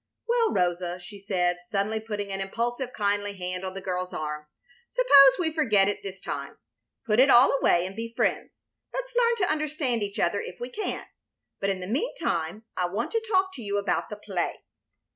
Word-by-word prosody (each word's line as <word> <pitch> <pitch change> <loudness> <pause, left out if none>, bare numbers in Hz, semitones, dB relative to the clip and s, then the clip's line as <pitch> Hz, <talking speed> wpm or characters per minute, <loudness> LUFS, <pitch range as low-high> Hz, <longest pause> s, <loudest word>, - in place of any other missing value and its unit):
"Well, 470 -1 +3
Rosa," 175 -1 0
she 180 +3 -11
said, 180 -3 0
suddenly, 200 +4 -1
putting 210 -2 -4
an 195 0 -3
impulsive, 240 +6 -2
kindly 205 -2 -1
hand 180 0 -4
on 190 0 -5
the 195 - -5
girl's 180 -1 -3
arm, 150 0 -4 0.4
"suppose 280 - +7
we 320 -3 -1
forget 220 -11 +3
it 205 - -2
this 195 -1 -7
time, - - -5 0.5
put 215 0 +2
it 270 +2 +7
all 255 +2 +7
away, 175 +1 +4
and 190 +1 -7
be 230 +1 -5
friends. - - -1 0.3
Let's - - -5
learn 475 -1 +4
to - - 0
understand 300 -6 -1
each 200 0 -3
other 200 +4 +1
if 180 - -8
we 245 - -5
can, 425 - -4 0.5
but 195 - 0
in 190 -1 -2
the - - -4
mean 265 - -1
time 170 - -2
I 180 - 0
want 205 +6 -3
to 455 -1 0
talk 375 -1 +3
to 255 - -9
you 205 -2 -2
about 200 - -1
the - - -5
play." - - -3
205 Hz, 200 wpm, -27 LUFS, 185-270 Hz, 0.5 s, suppose